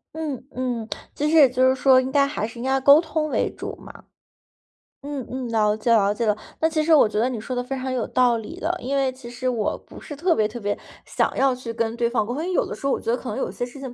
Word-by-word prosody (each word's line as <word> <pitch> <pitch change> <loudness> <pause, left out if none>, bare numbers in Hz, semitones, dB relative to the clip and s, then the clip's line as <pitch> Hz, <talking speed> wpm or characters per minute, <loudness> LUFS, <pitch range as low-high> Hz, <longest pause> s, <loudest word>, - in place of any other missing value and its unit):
嗯， 305 -6 -4
嗯。 245 -3 -3 0.3
其 295 - 0
实 325 - +2
也 280 -4 +8
就 255 +1 +3
是 260 - +4
说 260 0 +5
应 260 +1 -2
该 280 0 +4
还 225 -6 -3
是 235 +1 -11
应 - - -5
该 265 - 0
要 270 - +1
沟 285 +3 +7
通 315 -2 -2
为 - - 0
主 - - -6
嘛。 - - -11 1.1
嗯， 285 -4 -4
嗯， 255 -2 -4
了 210 -2 +2
解 220 +2 -1
了 205 -3 +4
解 230 +2 -2
了。 210 - +3 0.3
那 320 - +3
其 310 -1 0
实 320 +1 +3
我 225 - +5
觉 210 - -1
得 235 - +2
你 250 - -4
说 220 +4 -5
的 245 - -1
非 270 +2 -4
常 260 0 -3
有 250 -3 -1
道 245 -2 +3
理 220 - -8
的， 335 +3 -1
因 275 +2 -2
为 270 -1 +1
其 255 -2 -11
实 255 +1 -2
我 225 -4 -1
不 - - -12
是 295 - -8
特 335 +4 +2
别 215 -5 +2
特 230 +1 -8
别 205 0 -2 0.3
想 - - 0
要 270 -1 +3
去 250 -2 -6
跟 225 -1 -1
对 235 -1 +1
方 235 -3 0
沟 240 - -4
通， 295 - -3
因 345 - -3
为 - - -2
有 - - +2
的 - - -6
时 - - -9
候 - - +2
我 - - -2
觉 230 - -1
得 245 - +1
可 255 - -9
能 - - -4
有 - - -2
些 245 - -3
事 245 +3 -12
情 260 -3 -6
255 Hz, 325 characters per minute, -23 LUFS, 230-275 Hz, 1.1 s, 也